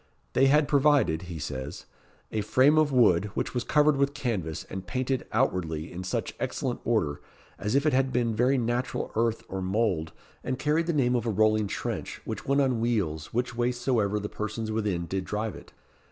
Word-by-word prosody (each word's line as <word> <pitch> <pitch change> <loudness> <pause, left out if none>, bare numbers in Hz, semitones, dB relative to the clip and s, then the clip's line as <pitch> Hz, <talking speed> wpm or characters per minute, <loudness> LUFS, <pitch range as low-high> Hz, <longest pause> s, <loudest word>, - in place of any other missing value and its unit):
"They 135 - +5
had 145 +1 +4
provided," 140 - +3
he 85 - -5
says, 70 -3 -5 0.5
"a 110 - -1
frame 130 +9 +4
of 155 -2 +3
wood, 105 -8 +4
which - - -2
was 125 -2 -1
covered 150 0 +3
with 140 +1 +1
canvas, 105 - -2
and 95 -1 -7
painted 130 +3 -1
outwardly 85 - 0
in 90 +1 -5
such 90 - -2
excellent - - -2
order, 70 0 0 0.4
as 105 +5 -1
if 140 +2 +3
it 155 - +3
had 135 0 +2
been 120 -2 +1
very 125 +4 +3
natural 120 +1 -1
earth 115 0 +1
or 95 0 -4
mould, 95 -5 0 0.3
and 130 0 -2
carried 150 +4 +1
the - - +2
name 125 -4 +2
of 120 -1 -1
a - - +2
rolling 110 0 +3
trench, - - -4
which - - -5
went 140 +1 +3
on 130 -4 +1
wheels 100 -10 -1
which 120 +1 -1
way 120 +1 +1
soever 120 -5 0
the 105 - -4
persons 110 +1 -4
within 105 -6 -1
did 95 +2 -2
drive 105 +2 -3
it. - - -13
115 Hz, 195 wpm, -27 LUFS, 95-130 Hz, 0.5 s, They